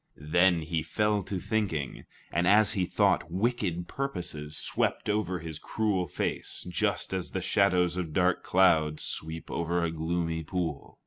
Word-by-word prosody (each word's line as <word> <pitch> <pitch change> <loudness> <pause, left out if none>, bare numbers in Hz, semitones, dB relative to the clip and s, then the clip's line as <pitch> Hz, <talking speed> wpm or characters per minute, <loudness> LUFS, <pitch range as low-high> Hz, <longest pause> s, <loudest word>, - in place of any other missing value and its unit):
Then 85 +3 +3
he 80 +1 -1
fell 105 +6 +1
to 95 +1 -4
thinking, 95 - -2 0.3
and 85 +2 +1
as 105 +1 +5
he 95 -4 0
thought, 90 - +2
wicked 95 -3 -1
purposes 85 - -4
swept - - -1
over 95 -4 0
his 80 -2 -7
cruel 100 -5 0
face - - -3
just 90 +2 -1
as 95 -2 -2
the 95 - -3
shadows 90 -2 +2
of 85 -4 -3
dark 90 +2 +2
clouds 80 -5 +3
sweep 80 +1 -4
over 85 +1 0
a 85 - 0
gloomy 80 0 -2
pool. 80 -3 -4
90 Hz, 150 wpm, -29 LUFS, 80-95 Hz, 0.3 s, as